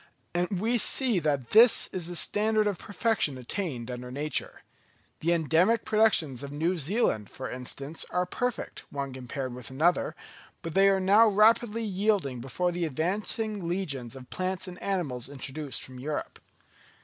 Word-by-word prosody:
And 175 Hz, +2 st, -1 dB
we 230 Hz, +4 st, +1 dB
see 240 Hz, -3 st, +3 dB
that 145 Hz, -6 st, -1 dB
this 225 Hz, +2 st, +7 dB
is 180 Hz, -3 st, -4 dB
the 175 Hz, -, -5 dB
standard 215 Hz, +5 st, +2 dB
of 205 Hz, -3 st, -1 dB
perfection 205 Hz, -, 0 dB
attained 125 Hz, -, -4 dB
under 125 Hz, 0 st, -6 dB
nature. 145 Hz, +4 st, -3 dB, 0.6 s
The 170 Hz, -, +1 dB
endemic 170 Hz, +7 st, +2 dB
productions 205 Hz, -, +2 dB
of 140 Hz, 0 st, -7 dB
New 165 Hz, +5 st, -1 dB
Zealand, 150 Hz, -, +1 dB
for 130 Hz, -, -7 dB
instance, 135 Hz, +4 st, -3 dB
are 180 Hz, 0 st, 0 dB
perfect, 245 Hz, +6 st, -3 dB
one 140 Hz, -2 st, -4 dB
compared 130 Hz, 0 st, -5 dB
with 125 Hz, -1 st, -7 dB
another; 160 Hz, +7 st, +1 dB, 0.5 s
but 165 Hz, -2 st, -5 dB
they 195 Hz, +1 st, +5 dB
are 195 Hz, -1 st, +3 dB
now 200 Hz, +4 st, +6 dB
rapidly 220 Hz, +2 st, +3 dB
yielding 195 Hz, -, 0 dB
before 155 Hz, +9 st, -1 dB
the 175 Hz, 0 st, -1 dB
advancing 195 Hz, -, -2 dB
legions 140 Hz, -9 st, -2 dB
of 130 Hz, -1 st, -12 dB
plants 185 Hz, 0 st, -2 dB
and 180 Hz, 0 st, -9 dB
animals 145 Hz, -11 st, -2 dB
introduced 140 Hz, +1 st, -5 dB
from 130 Hz, -1 st, -10 dB
Europe. 150 Hz, +3 st, -4 dB
175 Hz, 155 wpm, -28 LUFS, 135-205 Hz, 0.6 s, this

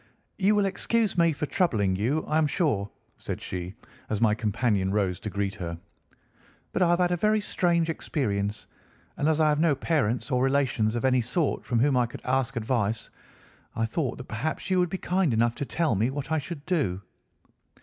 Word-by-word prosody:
"You 205 Hz, +2 st, +4 dB
will 205 Hz, -1 st, +3 dB
excuse 215 Hz, +2 st, 0 dB
my 170 Hz, -1 st, +4 dB
troubling 140 Hz, -, 0 dB
you, 125 Hz, +11 st, 0 dB
I 155 Hz, -, +1 dB
am 155 Hz, -, +3 dB
sure," 135 Hz, -, 0 dB, 0.3 s
said -, -, -5 dB
she, 90 Hz, +1 st, -5 dB, 0.3 s
as 110 Hz, -, -1 dB
my 110 Hz, -2 st, +4 dB
companion 105 Hz, -3 st, 0 dB
rose 95 Hz, -3 st, 0 dB
to 105 Hz, -, -5 dB
greet 100 Hz, -1 st, -2 dB
her, 85 Hz, -3 st, -5 dB, 0.9 s
"but -, -, -1 dB
I 175 Hz, -, +4 dB
have 175 Hz, -, +4 dB
had 180 Hz, 0 st, +2 dB
a -, -, +3 dB
very 215 Hz, +4 st, +2 dB
strange 170 Hz, -5 st, +1 dB
experience, 105 Hz, -10 st, -2 dB, 0.5 s
and 150 Hz, -, +1 dB
as 160 Hz, 0 st, +1 dB
I 155 Hz, -, +4 dB
have 150 Hz, 0 st, +1 dB
no 160 Hz, -3 st, +3 dB
parents 135 Hz, -4 st, 0 dB
or 125 Hz, -1 st, +2 dB
relations 130 Hz, -5 st, +1 dB
of 120 Hz, -, -1 dB
any 130 Hz, -1 st, +3 dB
sort 140 Hz, +6 st, -1 dB
from 120 Hz, -, -1 dB
whom 140 Hz, 0 st, +3 dB
I 125 Hz, -1 st, +3 dB
could -, -, -10 dB
ask 130 Hz, -1 st, 0 dB
advice, 115 Hz, -2 st, -1 dB, 0.6 s
I 115 Hz, -, +1 dB
thought 130 Hz, +2 st, -2 dB
that -, -, -7 dB
perhaps 135 Hz, -, -4 dB
you 185 Hz, -, +3 dB
would 180 Hz, -1 st, +2 dB
be 190 Hz, -, -3 dB
kind 180 Hz, -9 st, +1 dB
enough 115 Hz, +1 st, +2 dB
to 140 Hz, -, -2 dB
tell 160 Hz, -1 st, 0 dB
me 110 Hz, +5 st, +1 dB
what 135 Hz, +1 st, -5 dB
I 160 Hz, -, +2 dB
should 150 Hz, -1 st, -7 dB
do." 100 Hz, -, 0 dB
135 Hz, 200 wpm, -27 LUFS, 110-165 Hz, 0.9 s, You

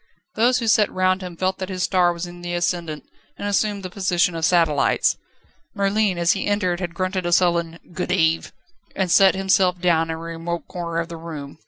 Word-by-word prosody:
Those 245 Hz, +3 st, +3 dB
who 240 Hz, -, -2 dB
sat 210 Hz, -1 st, +3 dB
round 185 Hz, 0 st, +1 dB
him 180 Hz, -2 st, -8 dB
felt 185 Hz, +1 st, -1 dB
that 185 Hz, 0 st, -4 dB
his 185 Hz, -1 st, -3 dB
star 180 Hz, -2 st, +3 dB
was 170 Hz, +1 st, -5 dB
in 175 Hz, 0 st, -11 dB
the 175 Hz, 0 st, -4 dB
ascendant 170 Hz, -3 st, -2 dB, 0.3 s
and 205 Hz, -, -4 dB
assumed 205 Hz, 0 st, 0 dB
the 185 Hz, -, -5 dB
position 180 Hz, -2 st, +1 dB
of 165 Hz, -1 st, -5 dB
satellites. 165 Hz, -5 st, +2 dB, 0.6 s
Merlin 200 Hz, -1 st, +1 dB
as 170 Hz, 0 st, +3 dB
he -, -, -1 dB
entered 185 Hz, -4 st, 0 dB
had 175 Hz, -2 st, -5 dB
grunted 185 Hz, 0 st, -2 dB
a -, -, -1 dB
sullen 170 Hz, -2 st, +2 dB, 0.2 s
"Good 180 Hz, +1 st, -3 dB
eve," 165 Hz, -3 st, +1 dB, 0.4 s
and 190 Hz, -3 st, -1 dB
sat 195 Hz, +1 st, +6 dB
himself 190 Hz, -1 st, +2 dB
down 170 Hz, -2 st, +2 dB
in 160 Hz, -, -2 dB
a -, -, -8 dB
remote 165 Hz, +1 st, -5 dB
corner 170 Hz, -2 st, -5 dB
of 170 Hz, -, -3 dB
the 170 Hz, -1 st, -8 dB
room. 155 Hz, -3 st, -8 dB
180 Hz, 205 wpm, -22 LUFS, 170-190 Hz, 0.6 s, sat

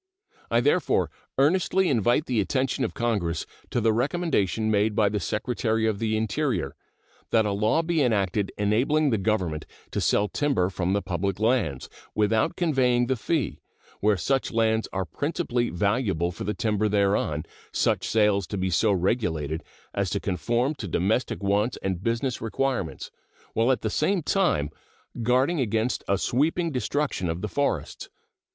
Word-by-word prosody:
I -, -, +3 dB
therefore 440 Hz, -, +2 dB, 0.3 s
earnestly 185 Hz, +6 st, +3 dB
invite 120 Hz, -, +2 dB
the 120 Hz, -4 st, +1 dB
attention 130 Hz, +6 st, 0 dB
of -, -, -3 dB
Congress 100 Hz, -9 st, -1 dB, 0.2 s
to -, -, 0 dB
the 110 Hz, -1 st, +3 dB
recommendation 120 Hz, -, 0 dB
made 105 Hz, 0 st, +2 dB
by 105 Hz, -1 st, +3 dB
the 105 Hz, +1 st, -1 dB
Secretary 110 Hz, +2 st, -1 dB
of 110 Hz, -3 st, 0 dB
the 110 Hz, -1 st, 0 dB
Interior, 110 Hz, -, -1 dB, 0.5 s
that 110 Hz, -1 st, +3 dB
a 105 Hz, -, 0 dB
law 105 Hz, +11 st, +2 dB
be 165 Hz, -1 st, +1 dB
enacted 100 Hz, -5 st, +1 dB
enabling 130 Hz, +9 st, +2 dB
the 110 Hz, -, +1 dB
Government 95 Hz, -7 st, -1 dB, 0.2 s
to -, -, -1 dB
sell 105 Hz, -, +2 dB
timber 115 Hz, -9 st, 0 dB
from 90 Hz, 0 st, -1 dB
the 100 Hz, -1 st, 0 dB
public 95 Hz, +2 st, -2 dB
lands 110 Hz, -, +1 dB, 0.3 s
without 110 Hz, +7 st, +2 dB
conveying 130 Hz, -8 st, +2 dB
the 130 Hz, +2 st, 0 dB
fee, 125 Hz, -, -1 dB, 0.4 s
where 105 Hz, -1 st, +3 dB
such 135 Hz, +9 st, 0 dB
lands 110 Hz, -1 st, +1 dB
are 95 Hz, -1 st, -2 dB
principally 125 Hz, -, -1 dB
valuable 95 Hz, -2 st, 0 dB
for 90 Hz, -, -7 dB
the 105 Hz, -, -2 dB
timber 110 Hz, -1 st, 0 dB
thereon, 100 Hz, -7 st, +1 dB, 0.3 s
such -, -, +1 dB
sales 105 Hz, -3 st, +2 dB
to 100 Hz, -, -4 dB
be 95 Hz, 0 st, -1 dB
so 105 Hz, +5 st, +3 dB
regulated 85 Hz, -, 0 dB, 0.3 s
as 100 Hz, -2 st, 0 dB
to 100 Hz, -, -1 dB
conform 120 Hz, +9 st, 0 dB
to 115 Hz, -9 st, -6 dB
domestic 100 Hz, +6 st, 0 dB
wants 105 Hz, +5 st, +1 dB
and 95 Hz, -2 st, -2 dB
business 115 Hz, +3 st, -1 dB
requirements, 115 Hz, -4 st, -2 dB, 0.4 s
while 115 Hz, +3 st, +3 dB
at 130 Hz, -, 0 dB
the 110 Hz, -, -1 dB
same 175 Hz, -, +1 dB
time 80 Hz, -, +1 dB, 0.5 s
guarding 130 Hz, +8 st, +2 dB
against 115 Hz, 0 st, 0 dB
a 100 Hz, -, +2 dB
sweeping 160 Hz, -, +1 dB
destruction 130 Hz, -, -1 dB
of 80 Hz, +2 st, -3 dB
the 105 Hz, -, -2 dB
forests. 105 Hz, -, -2 dB
110 Hz, 160 wpm, -26 LUFS, 100-130 Hz, 0.5 s, I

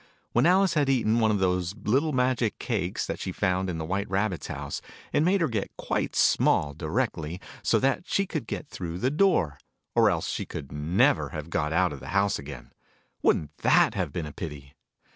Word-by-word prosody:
When 120 Hz, +6 st, +3 dB
Alice 185 Hz, 0 st, +4 dB
had 145 Hz, -3 st, +2 dB
eaten 120 Hz, -4 st, +2 dB
one 110 Hz, -1 st, +3 dB
of 105 Hz, -, +2 dB
those 90 Hz, -1 st, 0 dB
little 130 Hz, +9 st, +1 dB
magic 125 Hz, -4 st, +1 dB
cakes, 95 Hz, -7 st, -2 dB
that -, -, -4 dB
she 95 Hz, -, -3 dB
found 95 Hz, 0 st, 0 dB
in 85 Hz, -, -3 dB
the 80 Hz, -, -3 dB
White 95 Hz, +4 st, -2 dB
Rabbit's 95 Hz, -4 st, -1 dB
house, 70 Hz, -1 st, -5 dB, 0.3 s
it -, -, +3 dB
made 185 Hz, +4 st, +3 dB
her 165 Hz, -, +3 dB
get 110 Hz, -6 st, -2 dB
quite -, -, -2 dB
small, 70 Hz, -1 st, +3 dB
directly, 85 Hz, -, -2 dB, 0.2 s
so -, -, +3 dB
that 135 Hz, +6 st, 0 dB
she 200 Hz, -, +1 dB
could 160 Hz, -5 st, -4 dB
get -, -, -5 dB
through 85 Hz, -7 st, -5 dB
the 125 Hz, +7 st, 0 dB
door: 150 Hz, -, +2 dB, 0.3 s
or -, -, +5 dB
else -, -, -1 dB
she -, -, -2 dB
could 70 Hz, -, -7 dB
never 75 Hz, +5 st, +2 dB
have 75 Hz, +1 st, -7 dB
got 75 Hz, -1 st, 0 dB
out 90 Hz, 0 st, +2 dB
of 70 Hz, -, -8 dB
the 65 Hz, -, -10 dB
house 100 Hz, 0 st, +2 dB
again. 70 Hz, -3 st, -9 dB, 0.5 s
Wouldn't 75 Hz, -1 st, +1 dB
that -, -, +4 dB
have -, -, -2 dB
been 85 Hz, -, -3 dB
a 75 Hz, -, -8 dB
pity 70 Hz, -4 st, -7 dB
95 Hz, 200 wpm, -27 LUFS, 80-125 Hz, 0.5 s, or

